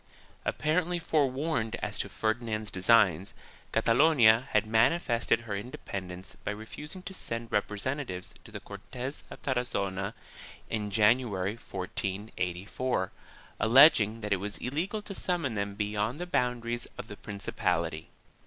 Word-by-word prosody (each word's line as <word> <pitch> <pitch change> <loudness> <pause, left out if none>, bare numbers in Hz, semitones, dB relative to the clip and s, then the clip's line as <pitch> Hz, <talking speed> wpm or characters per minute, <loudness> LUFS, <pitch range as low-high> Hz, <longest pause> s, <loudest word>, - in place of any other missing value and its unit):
1 - - -1
Apparently 175 +3 +1
forewarned 140 -6 0
as - - -4
to - - -1
Ferdinand's 110 -1 -2
designs, 95 -2 +3 0.4
Catalonia 115 0 +5
had - - +2
manifested 115 +2 +2
her 110 -4 -4
independence 95 -4 -6
by - - -2
refusing 150 - -7
to 190 - -7
send 115 -9 -3
representa 125 +7 -1
tives 90 0 -6
to - - -14
the - - -6
Cortes 130 +3 -7
of - - -10
Tarazona 100 -6 -1 0.6
in 105 -2 -1
January, 105 -2 +3
1484, 95 +1 -3 0.5
alleging 115 -2 +6
that 105 -1 0
it - - +2
was 100 +2 -3
illegal 175 - -2
to 200 - -7
summon 175 - 0
them 100 -1 -2
beyond 105 +4 -1
the 175 - -3
boundaries 120 -6 0
of - - -6
the 105 - -8
prin 100 -2 -7
cipality. 80 -4 -1
115 Hz, 135 wpm, -30 LUFS, 100-130 Hz, 0.6 s, alleging